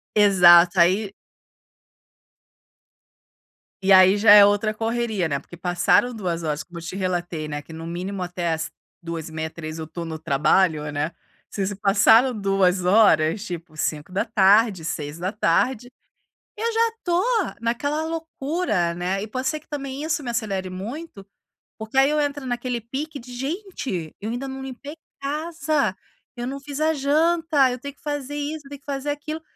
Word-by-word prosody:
Exato 180 -3 +6
aí 190 +4 +3 2.7
E 195 0 +2
aí 190 +1 +7
já 205 0 +6
é 205 -1 +10
outra 205 +1 +1
correria, 225 -4 -1
né, 140 -3 -1
porque 175 - -14
passaram 175 +8 +2
2 175 -6 -3
horas, 150 -1 -2
como 175 +1 -10
eu - - -10
te 170 - -6
relatei 175 -4 -2
né, 145 -1 -4
que 160 - -13
no 165 +1 -7
mínimo 185 +3 -4
até 175 -2 -2
às 160 0 -4 0.3
14:30h, 160 -1 -5
15h 155 0 -7
eu 160 - -4
estou 170 +2 -7
no 160 -1 -5
trabalho, 150 +2 +2
né. 150 +3 -2 0.4
Se 195 -2 -2
se 205 - -3
passaram 210 +5 +4
2 195 -3 +1
horas, 185 -2 +4
tipo 170 -2 -7
17:00, 195 +5 +2
18:00, 170 - -1 0.7
eu 460 +2 -1
já 460 +1 +3
estou 370 -6 -1 0.4
naquela 285 +7 -1
loucura, 320 - -2
né, 180 +3 -2
e 215 - -6
pode 255 +4 -3
ser 310 +1 -1
que - - -28
também 275 -1 -5
isso 315 -1 -1
me 245 - -4
acelere 200 -5 -2
muito, 210 - -7 0.5
porque 220 +4 -4
aí 270 +1 +6
eu 300 0 +1
entro 285 -2 -2
naquele 245 0 -2
pique 280 +7 -5
de: 250 0 -12
"Gente, 270 - -4
eu 215 - -4
ainda 245 +4 -4
não 265 0 -6
limpei 270 +3 -8 0.3
casa, 300 - -1 0.4
eu 240 0 -4
não 275 +2 -5
fiz 285 +1 -7
a 315 +1 +2
janta, 305 0 +2
eu 250 - -5
tenho 280 +2 -8
que - - -32
fazer 290 -1 -4
isso, 295 0 -5
tenho 285 0 -9
que 280 - -35
fazer 280 0 -3
aquilo." 305 +2 -5
215 Hz, 160 wpm, -23 LUFS, 175-280 Hz, 2.7 s, é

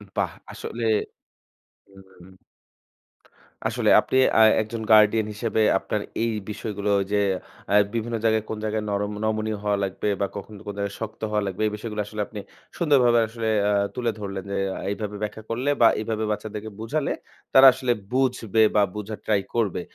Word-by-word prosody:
বাহ! - - 0 0.2
আসলে 120 0 -6 1.0
হুম, 95 0 -16 0.2
হুম। 90 +2 -14 1.4
আসলে - - +1
আপনি - - -2 0.2
আ - - +6 0.2
একজন 110 +1 -6
গার্ডিয়ান 105 0 +5
হিসেবে 110 +1 0 0.2
আপনার 105 - -3 0.2
এই 115 - +1 0.2
বিষয়গুলো 105 -1 -3 0.2
যে 105 - +3 0.5
আ - - +4 0.2
বিভিন্ন 115 0 -2
জায়গায় 110 -1 +2
কোন 110 - -3
জায়গায় 110 0 -1
নরম 100 +1 -1
নমনীয় 110 -1 -1
হওয়া 100 -1 +1
লাগবে 95 +2 -3
বা 100 - +2
কখন 105 +2 -8
কোন 105 - -4
জায়গায় 100 -1 -3
শক্ত 110 0 -6
হওয়া 105 -1 +1
লাগবে 95 +2 -3
এই 105 - -1
বিষয়গুলো 105 -1 -5
আসলে 105 0 -6
আপনি 105 -2 -8 0.4
সুন্দরভাবে 130 -8 +4
আসলে 115 -1 -3 0.2
আ - - +2 0.2
তুলে 120 -2 0
ধরলেন 100 -2 -5
যে - - -1 0.3
এইভাবে 105 0 -4
ব্যাখ্যা 110 +1 -4
করলে 125 +5 0
বা 115 - +8
এভাবে 110 0 -2
বাচ্চাদেরকে 110 0 -5
বুঝালে 140 +6 -1 0.4
তারা 135 0 +9
আসলে 130 -2 0 0.2
বুঝবে 120 -5 +2
বা 105 - +6
বুঝার 105 0 -5
ট্রাই 105 -2 +3
করবে। 105 -6 0
110 Hz, 160 wpm, -24 LUFS, 105-115 Hz, 1.4 s, তারা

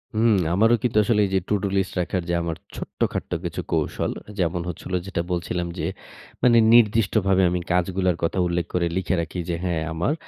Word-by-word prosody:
হুম। 110 0 +4 0.2
আমারও 115 +6 +4
কিন্তু 115 -3 0
আসলে 105 -1 +2
এই - - -3
যে - - +4
টুডু-লিস্ট 100 -2 0
রাখার 90 +1 -1
যে 85 - +1
আমার 85 -1 -3 0.2
ছোট্টখাট্ট - - -3
কিছু - - -3
কৌশল - - -1 0.3
যেমন 85 0 0
হচ্ছিল 90 +2 -7
যেটা 95 -3 -2
বলছিলাম 90 0 -2
যে 80 - -1 0.6
মানে 120 -2 +6 0.2
নির্দিষ্টভাবে 105 -4 +4
আমি 90 0 -1
কাজগুলার 90 0 +1
কথা 85 - 0
উল্লেখ 85 -1 -1
করে 85 -1 +1
লিখে 95 0 0
রাখি 85 +2 -5
যে, 85 - 0
"হ্যাঁ 85 -3 -1
আমার 85 - 0
95 Hz, 175 wpm, -23 LUFS, 85-105 Hz, 0.6 s, মানে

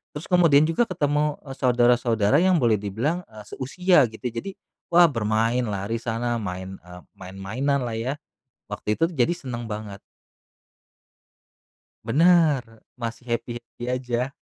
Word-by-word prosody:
terus 150 - -7
kemudian 165 -5 +5
juga 225 +9 +1
ketemu, 150 -4 0
eee, 135 -2 -8
saudara-saudara 120 -1 +3
yang 185 +1 +4
boleh 115 -4 +2
dibilang, 120 - -2
eee, 105 -1 -11
seusia 165 - +2
gitu, 110 - -13
jadi, 120 +12 -5 0.4
wah, 175 0 +7
bermain 115 +1 0
lari 100 +2 -3
sana, 120 +1 -2
main, 95 -2 -5
eee, 90 0 -12 0.3
mainan 130 +8 -1
lah 115 - -4
ya, 120 +4 -2 0.6
waktu 105 0 -2
itu, 165 - +3
jadi 135 -1 +1
seneng 120 -7 -6
banget. 105 -2 -6 2.1
Benar, 160 -4 +4 0.3
masih 120 0 -6
happy-happy 120 0 -5
aja, 125 0 -2
120 Hz, 130 wpm, -24 LUFS, 110-145 Hz, 2.1 s, wah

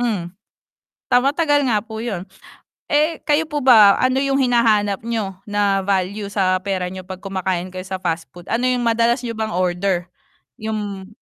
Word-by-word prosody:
Hmm. 225 -7 0 0.9
Ta 245 - +6
matagal 290 0 +2
nga 215 -3 +2
po 220 -1 -8
'yun. 200 -7 -3 0.7
Eh, 305 +2 +2
kayo 295 +1 +2
po 295 -2 -2
ba 215 -6 +8
ano 255 0 +2
yung 275 0 +1
hinahanap 220 -5 +2
niyo, 210 -5 -2
na 205 -1 +1
value 200 +1 -1
sa 185 -2 +2
pera 185 -2 -2
niyo 185 0 -8
'pag 185 -1 -8
kumakain 185 -2 -2
kayo 185 0 -7
sa 190 0 -5
fast 165 -1 -2
food? 175 0 -13
Ano 235 +2 0
yung 250 -1 +1
madalas 235 +2 +2
niyo 230 -2 -5
bang 220 0 -2
order? 180 0 0 0.5
Yung 205 -3 -4
205 Hz, 170 wpm, -20 LUFS, 190-240 Hz, 0.9 s, ba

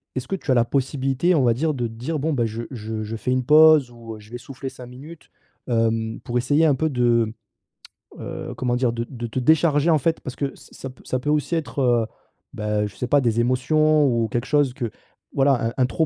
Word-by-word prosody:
est-ce 130 - -4
que 195 - -2
tu 150 - -3
as - - +5
la 120 -1 +3
possibilité, 135 +6 0
on 140 - +3
va 120 -2 +4
dire, 155 +5 0
de 120 -3 -2
dire: 125 +8 -4
«Bon, 155 +3 -1
bah, 120 -4 +1
je 115 +1 -4
je 110 -2 -5
je 110 +2 -5
fais 125 - -2
une 130 0 +1
pause 155 -2 +6
ou, 115 -2 -9
heu, - - -12
je 105 +2 -17
vais 120 - -5
souffler 135 +2 -8
5 125 -1 -11
minutes»? 140 +6 -12 0.4
Hem, 115 -1 0
pour 120 0 -2
essayer 145 +6 +2
un 150 - +4
peu 160 +4 0
de, 120 -4 +1 0.9
heu, - - -6
comment 125 -1 0
dire? 125 -1 +1
De 115 0 -3
de 120 -3 -6
te 115 - -3
décharger, 155 +3 +3
en 155 -3 +4
fait, 165 +4 0
parce 130 - -7
que 140 -1 -3
ça - - -16
ça 135 - -7
p 130 - -16
ça 130 - -1
peut 145 +4 -4
aussi 150 +2 +1
être, 155 -3 -3
heu, 120 -4 +2 0.5
bah, 105 0 -1
je 100 - -12
sais 125 - -4
pas, 145 0 +3
des 115 -2 +1
émotions 150 +5 +3
ou 115 -2 +1
quelque 120 +4 -3
chose 145 -4 +2
que, 120 -5 -4 0.4
voilà, 135 -4 +2
un 115 - -8
un 130 - +3
trop 125 +6 0
125 Hz, 245 wpm, -22 LUFS, 115-145 Hz, 0.9 s, pause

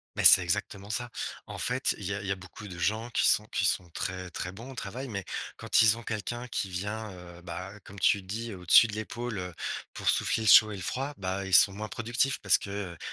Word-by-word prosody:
Mais - - -1
c'est 95 - +10
exactement 95 +3 -3
ça! 120 +2 -3 0.4
En - - -8
fait, 130 +2 +1
il 100 - -7
y 100 - -2
a 100 - -5
il 100 - -7
y - - -1
a - - +1
beaucoup 95 +2 -11
de 90 -2 -9
gens 110 +5 -1
qui - - +3
sont 105 - +3
qui 95 - -1
sont 90 -1 0
très 90 +1 -5
très 90 - -5
bons 115 +8 -10
au - - -11
travail, 125 +5 -6
mais 100 -2 -4 0.3
quand - - +3
ils 110 0 +5
ont - - -8
quelqu'un 120 +3 -4
qui 100 -4 -3
vient, 105 +4 -4
heu, 90 -1 -12
bah, 90 +4 -7
comme 100 +2 -12
tu 100 0 +3
dis, 110 +5 -5
au-dessus 90 +5 +6
de 105 - -8
l'épaule, 115 +1 -5
heu, 90 -2 -5 0.4
pour - - -1
souffler - - +1
le - - -2
chaud 110 +2 +8
et - - -5
le 95 - -8
froid, 135 +9 -3
bah, 95 0 -3
ils 95 - -6
sont 100 - +8
moins 105 +2 -5
productifs 120 +3 0
parce 95 -7 +5
que, 100 - -9
heu, 100 -4 -5
100 Hz, 250 wpm, -28 LUFS, 95-115 Hz, 0.4 s, c'est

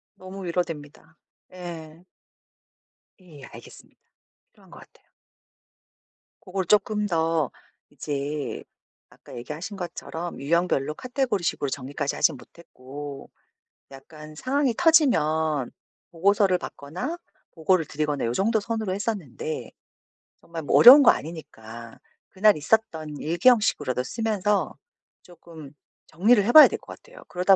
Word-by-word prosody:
너무 185 +1 -10
위로됩니다. 165 -3 -5 0.4
예. 170 -1 -10 1.2
예 155 -7 -15
알겠습니다. - - -15 0.5
필요한 - - -23
것 - - -13
같아요. - - -21 1.4
고걸 190 0 -3
쪼끔 210 +1 +1
더 165 -4 0 0.4
이제 145 -1 -5 0.5
아까 - - -15
얘기하신 155 - -7
것처럼 175 -1 -7
유형별로 150 -1 0
카테고리 250 - -2
식으로 145 -4 -1
정리까지 140 +1 -4
하진 155 -5 +1
못했고 140 -1 -11 0.6
약간 150 +3 -13
상황이 260 - 0
터지면 160 - +2 0.4
보고서를 195 +2 +2
받거나 185 - -6 0.3
보고를 165 +1 +1
드리거나 150 -2 -3
요 115 - -1
정도 220 - +1
선으로 220 -3 -3
했었는데 195 - -5 0.7
정말 165 -1 -8
뭐 - - 0
어려운 265 +5 +10
거 265 - +7
아니니까 115 -8 -9 0.3
그날 205 -2 +3
있었던 160 -5 -1
일기 170 +9 -1
형식으로도 145 - +1
쓰면서 210 - -1 0.5
쪼끔 165 -4 -14 0.4
정리를 205 +6 +3
해 235 - +1
봐야 310 +2 +10
될 - - -5
것 - - -12
같아요. - - -16
그러다 185 +2 +3
170 Hz, 285 characters per minute, -24 LUFS, 150-205 Hz, 1.4 s, 어려운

